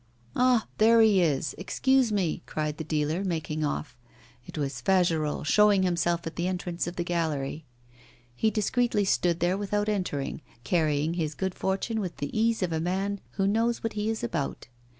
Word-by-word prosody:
'Ah! 250 -3 +3
there 230 +2 +6
he 210 -4 +5
is; 155 -3 +1
excuse 260 +5 +2
me!' 190 -6 0
cried 150 -1 -3
the - - -2
dealer, 155 +3 -1
making 155 -4 -2
off. 145 -2 -3 0.5
It - - -9
was 135 -4 -3
Fagerolles 165 -4 +1
showing 205 +2 +5
himself 170 -1 0
at 165 - -6
the 170 +1 0
entrance 180 -2 -3
of 175 - -5
the 175 - -1
gallery. 160 -4 -2 0.7
He 220 - +2
discreetly 215 0 +1
stood 175 -3 +1
there 180 +3 +1
without 205 +1 -1
entering, 180 -9 -2 0.2
carrying 155 +1 +1
his 160 -3 -2
good 190 -1 -2
fortune 195 +5 -1
with 185 -5 -4
the 145 - -5
ease 225 -1 +2
of 170 -2 -1
a 160 - 0
man 195 +4 -1
who 195 - 0
knows 230 +4 +1
what 225 - -2
he 210 +1 -1
is 225 - -3
about. 135 +4 -3
180 Hz, 175 wpm, -27 LUFS, 155-210 Hz, 0.7 s, there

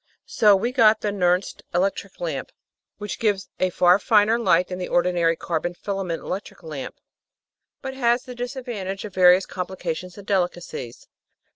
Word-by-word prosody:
So 210 -2 +4
we 230 +6 -1
got 220 -4 +4
the 210 - 0
Nernst 180 -1 0
electric 195 - -1
lamp, - - -4 0.5
which 210 -1 -6
gives 205 -3 0
a 185 - +2
far 180 +1 +4
finer 215 +2 +3
light 180 -6 +3
than 180 0 -5
the 180 - -4
ordi 175 +1 +2
nary 165 -1 +2
carbon 175 +1 -3
filament 190 -4 -4
electric 195 +2 -6
lamp, 150 -4 -6 0.9
but 265 0 -4
has 240 -1 +1
the 255 - -9
disadvantage 240 -6 -5
of 205 - -8
various 185 0 +6
complications 180 -1 -5
and 200 - -11
delicacies. 175 - -3
190 Hz, 155 wpm, -23 LUFS, 180-215 Hz, 0.9 s, various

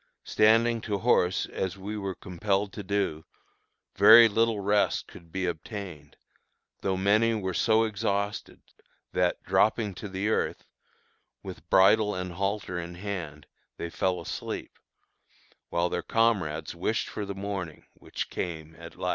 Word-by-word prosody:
Standing 115 +2 +3
to 105 -2 -2
horse 95 -5 +2
as 95 0 -4
we 100 +3 -6
were 100 -3 -4
compelled 95 +2 -2
to 105 - -6
do, 100 -6 -1 0.7
very 110 +4 +9
little 115 0 +1
rest 100 +1 +1
could 85 -2 -15
be 95 +1 -2
obtained, 90 -1 -6 0.7
though 95 -1 0
many 105 +4 +3
were 95 -3 -3
so 110 +4 +3
exhausted, 100 -1 -2 0.5
that, - - 0
dropping 110 -2 +2
to 100 +3 -8
the 95 +2 -2
earth, 110 - -1 0.8
with - - -10
bridle 105 +2 +5
and 90 -1 -4
halter 95 -1 -2
in 85 0 -7
hand, 90 -6 -6 0.3
they 85 - -5
fell 90 +1 0
asleep, - - -5 1.0
while 85 +1 +1
their 90 - -2
comrades 95 -10 0
wished 95 +6 -1
for 105 - -5
the 100 -1 -5
morning, 95 -5 -5
which - - -6
came 80 -2 -5
at 85 0 -11
last. - - -3
100 Hz, 140 wpm, -28 LUFS, 90-105 Hz, 1.0 s, very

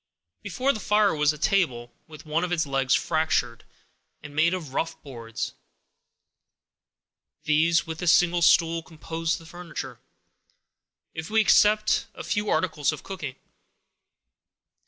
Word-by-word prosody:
Before 275 +2 0
the 220 - -6
fire 210 -3 +2
was 150 0 +3
a 150 - -8
table, 140 - 0
with 155 0 -13
one 155 +3 -1
of 180 - -3
its 165 -3 +1
legs 135 -1 +1
fractured, 155 -7 -1 0.6
and 145 -1 -10
made 165 +4 +3
of 155 -7 -8
rough 165 - -2
boards; 115 -5 -6 1.9
these, 160 +3 +2
with 160 -1 -7
a 180 - -3
single 175 +1 +4
stool, 165 0 +4
composed 165 0 -4
the 165 - -14
furniture, 175 +1 -8 1.1
if 160 0 -6
we 220 +1 +2
except 215 0 +3
a - - -7
few 205 0 -2
articles 160 -5 +1
of 155 - -8
cooking. 160 -9 -6
165 Hz, 135 wpm, -25 LUFS, 150-180 Hz, 1.9 s, single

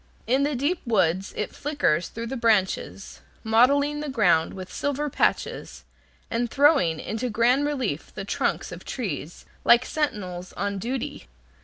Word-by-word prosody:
In 260 +4 +2
the 290 0 +1
deep 290 +8 0
woods 190 -5 +1
it 210 - -3
flickers 280 - 0
through 230 +1 -6
the 255 +3 -4
branches, 210 -4 0 0.2
mottling 280 +6 +3
the 300 -1 -4
ground 180 -11 +2
with 185 -1 -8
silver 285 +1 -2
patches, - - -1 0.5
and 235 +1 0
throwing 275 - +3
into 230 +3 -3
grand 245 +6 +3
relief 285 -3 -3
the - - -5
trunks - - -1
of - - -8
trees, 175 - -5 0.2
like 240 +2 +6
sentinels 185 - -3
on 200 -1 -2
duty. 245 +5 -4
235 Hz, 145 wpm, -25 LUFS, 195-280 Hz, 0.5 s, like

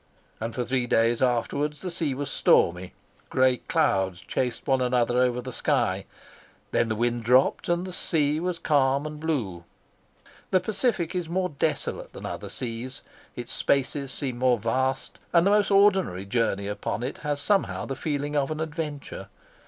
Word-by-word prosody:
And 115 +1 -4
for 125 -1 -1
three 125 0 0
days 115 0 +2
afterwards 135 +4 0
the 185 - -4
sea 160 -5 -1
was 145 0 -4
stormy. 90 +2 +3 0.4
Gray 130 -1 +3
clouds 95 -5 +1
chased 125 -2 -2
one 135 -2 +2
another 125 0 +2
across 125 -1 +1
the 130 - -6
sky. - - 0 0.7
Then 115 - +2
the 110 - 0
wind 120 +1 0
dropped, 125 +7 +3
and 175 +1 +1
the 185 - -7
sea 150 -3 +1
was 180 0 -2
calm 140 -3 +2
and 150 0 -6
blue. 120 - -2 0.9
The 185 - +4
Pacific 195 -3 0
is 175 -3 -2
more 180 +1 0
desolate 140 - -2
than - - -8
other - - -5
seas; 125 +2 -5 0.3
its 120 -1 -6
spaces 140 0 0
seem 130 -4 -4
more 125 -1 +4
vast, 130 +5 -1
and 170 0 +5
the 200 - +4
most 205 -1 +3
ordinary 195 - +3
journey 100 -2 0
upon 105 +2 -3
it 130 - -4
has 145 -1 -2
somehow 195 +7 +1
the 135 - -4
feeling 145 0 -2
of 140 -2 +1
an 155 0 -3
adventure. 150 - -5
135 Hz, 170 wpm, -26 LUFS, 120-155 Hz, 0.9 s, and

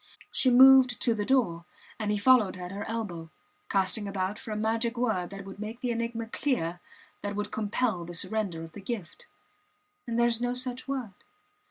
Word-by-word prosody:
She 260 - +2
moved 260 -1 +7
to 235 - +3
the 210 -2 -3
door, 215 -11 +2 0.4
and 215 -1 -2
he 210 - +1
followed 210 -4 +4
at 180 0 -6
her 200 +1 -5
elbow, 185 -8 -4 0.4
casting 195 +2 +1
about 195 0 -2
for - - -10
a 215 - -2
magic 225 +2 0
word 220 -8 0
that 195 0 -8
would 195 0 -10
make 220 +3 -6
the 245 - -1
enigma 230 0 -2
clear, 220 - -1 0.4
that 205 0 -3
would 210 0 -3
compel 215 -3 -1
the 175 +1 -7
surrender 190 -3 -2
of 165 - -9
the 205 - -10
gift. 195 -5 -6 0.8
And 230 -1 -2
there 235 - +4
is 235 -1 +2
no 245 0 0
such 250 0 -3
word! 260 -7 -3
220 Hz, 190 wpm, -28 LUFS, 195-240 Hz, 0.8 s, moved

